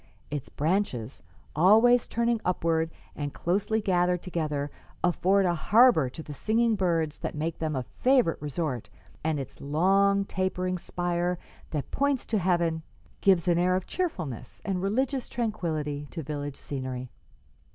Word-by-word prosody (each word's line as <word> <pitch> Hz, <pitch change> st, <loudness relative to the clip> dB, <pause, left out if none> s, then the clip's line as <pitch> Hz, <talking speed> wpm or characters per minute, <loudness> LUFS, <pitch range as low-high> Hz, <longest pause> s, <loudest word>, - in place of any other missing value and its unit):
Its 145 Hz, -3 st, -4 dB
branches, 145 Hz, -, -1 dB, 0.3 s
always 225 Hz, +9 st, +6 dB
turning 235 Hz, -1 st, 0 dB
upward 165 Hz, -2 st, +1 dB, 0.3 s
and 145 Hz, -1 st, -4 dB
closely 205 Hz, +5 st, 0 dB
gathered 180 Hz, -3 st, +1 dB
together, 150 Hz, -5 st, -2 dB, 0.3 s
afford 190 Hz, +2 st, +3 dB
a 175 Hz, -, +2 dB
harbor 190 Hz, -, +5 dB
to 160 Hz, +5 st, -8 dB
the 150 Hz, -, -8 dB
singing 225 Hz, +9 st, +2 dB
birds 165 Hz, -5 st, 0 dB
that -, -, -4 dB
make 160 Hz, +2 st, -3 dB
them 155 Hz, -2 st, -1 dB
a 130 Hz, -, -1 dB
favorite 250 Hz, -, +2 dB
resort, 145 Hz, -4 st, -3 dB, 0.3 s
and 155 Hz, -2 st, 0 dB
its 135 Hz, -, -8 dB
long, 195 Hz, +7 st, +3 dB
tapering 185 Hz, -1 st, -1 dB
spire 175 Hz, 0 st, -1 dB, 0.3 s
that 150 Hz, -3 st, -4 dB
points 280 Hz, -2 st, +1 dB
to 220 Hz, -, 0 dB
heaven 170 Hz, -3 st, +1 dB, 0.4 s
gives 185 Hz, -3 st, +4 dB
an 175 Hz, -1 st, +3 dB
air 180 Hz, +1 st, +3 dB
of 185 Hz, -, -1 dB
cheerfulness 180 Hz, -, -4 dB
and 190 Hz, -3 st, -1 dB
religious 255 Hz, +6 st, 0 dB
tranquillity 155 Hz, -11 st, -2 dB
to 165 Hz, -, -6 dB
village 145 Hz, -1 st, -4 dB
scenery.'" 130 Hz, -2 st, -5 dB
175 Hz, 140 wpm, -28 LUFS, 150-200 Hz, 0.4 s, always